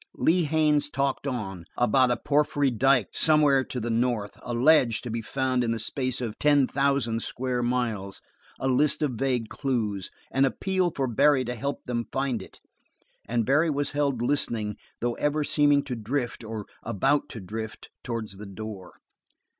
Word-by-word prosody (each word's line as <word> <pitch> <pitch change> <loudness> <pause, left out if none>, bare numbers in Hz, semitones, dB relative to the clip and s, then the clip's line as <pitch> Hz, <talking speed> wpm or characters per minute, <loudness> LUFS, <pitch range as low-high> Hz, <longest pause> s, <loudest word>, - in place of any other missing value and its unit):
Lee 175 +1 +2
Haines 150 -1 +2
talked 140 0 -1
on 95 -9 -4
about 125 +2 +4
a 120 - +1
porphyry 145 -1 +1
dyke 125 -1 +3
somewhere 150 -4 +4
to 125 - -5
the 120 0 -2
north 115 -3 0
a 125 - -6
ledge 125 -1 +4
to 120 - -6
be 115 +1 -2
found 130 +1 0
in 115 - -1
the 115 - 0
space 130 +3 -2
of 115 -3 -4
ten 145 -2 +4
thousand 135 -5 0
square 125 +1 -2
miles 115 -6 -2 0.4
a 135 - -1
list 150 +4 +2
of 145 - +1
vague 125 -2 -1
clues 110 -8 -2 0.2
an 135 - +2
appeal 185 +6 +1
for 140 -4 -2
Barry 130 +2 +3
to 125 - -3
help 140 +4 -4
them 120 -1 -3
find 135 -5 -1
it - - -12 0.7
and 115 -1 0
Barry 150 +6 +3
was 145 -1 -1
held 140 -5 0
listening 115 -6 0 0.3
though 120 0 0
ever 150 +1 0
seeming 145 -1 +3
to 130 -3 -4
drift, 120 +2 -3
or 110 -2 -6 0.2
about 135 +9 +1
to 115 - -7
drift, 110 +3 -7
towards 110 -5 -5
the 105 0 -9
door. 100 -2 -8
125 Hz, 170 wpm, -26 LUFS, 115-140 Hz, 0.7 s, about